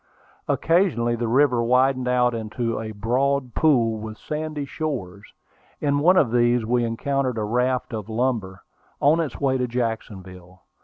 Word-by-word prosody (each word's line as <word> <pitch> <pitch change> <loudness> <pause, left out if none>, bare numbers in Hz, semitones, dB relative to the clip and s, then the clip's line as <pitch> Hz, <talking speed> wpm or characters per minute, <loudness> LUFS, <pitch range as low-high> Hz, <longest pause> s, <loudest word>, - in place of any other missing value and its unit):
Occasionally 165 -10 +1
the 120 0 -2
river 125 0 +3
widened 130 +2 +2
out 125 -1 +2
into 115 +1 -3
a 110 0 -5
broad 125 +4 -1
pool, 115 -8 +2
with 110 0 -7
sandy 155 -1 -4
shores. 110 - -5 0.5
In 145 -1 +1
one 180 +5 +4
of 125 -9 +3
these 120 -1 +2
we 120 +1 +1
encountered 130 +2 -1
a 110 - -1
raft 125 +3 -1
of 110 -1 -5
lumber, 110 -5 -2 0.4
on 150 +4 +4
its 160 -4 -3
way 130 -2 +1
to 125 - 0
Jacksonville. 95 -7 -5
125 Hz, 150 wpm, -23 LUFS, 110-140 Hz, 0.5 s, one